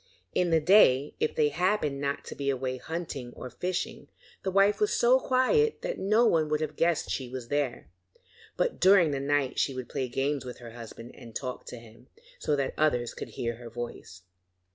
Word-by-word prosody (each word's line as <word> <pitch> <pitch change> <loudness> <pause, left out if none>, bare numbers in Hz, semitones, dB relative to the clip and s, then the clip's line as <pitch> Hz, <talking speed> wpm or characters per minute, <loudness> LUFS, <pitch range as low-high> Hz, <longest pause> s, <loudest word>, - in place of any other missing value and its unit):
In 180 - +2
the 165 -1 +4
day, 150 -6 +5
if - - 0
they 150 -1 +3
happened 165 -4 0
not 140 0 -2
to - - -7
be 140 -1 -2
away 130 -1 -1
hunting 145 -4 -5
or 125 - -8
fishing, 180 0 -3 0.3
the 190 - -2
wife 195 +2 +3
was 420 0 +2
so - - +4
quiet 440 - +2
that - - -3
no 215 +5 +3
one 160 -8 +3
would 150 0 +1
have 155 -1 -3
guessed 165 -2 +1
she 130 -2 -3
was 125 -2 -7
there, 145 - -1 0.7
but - - 0
during 185 -4 +6
the 140 - -1
night 140 -1 0
she 135 - +1
would 130 -2 -5
play 130 - -2
games 135 +2 -1
with 125 -1 -8
her 120 -1 -10
husband 115 0 -10
and 115 -2 -13
talk 130 -2 -5
to 125 - -7
him, 115 -1 -16 0.3
so 150 - +1
that 140 -2 -2
the - - -5
others 125 -6 +2
could - - -7
hear 115 -1 -4
her 120 -1 -9
voice. 115 -6 -8
145 Hz, 205 wpm, -28 LUFS, 125-175 Hz, 0.7 s, during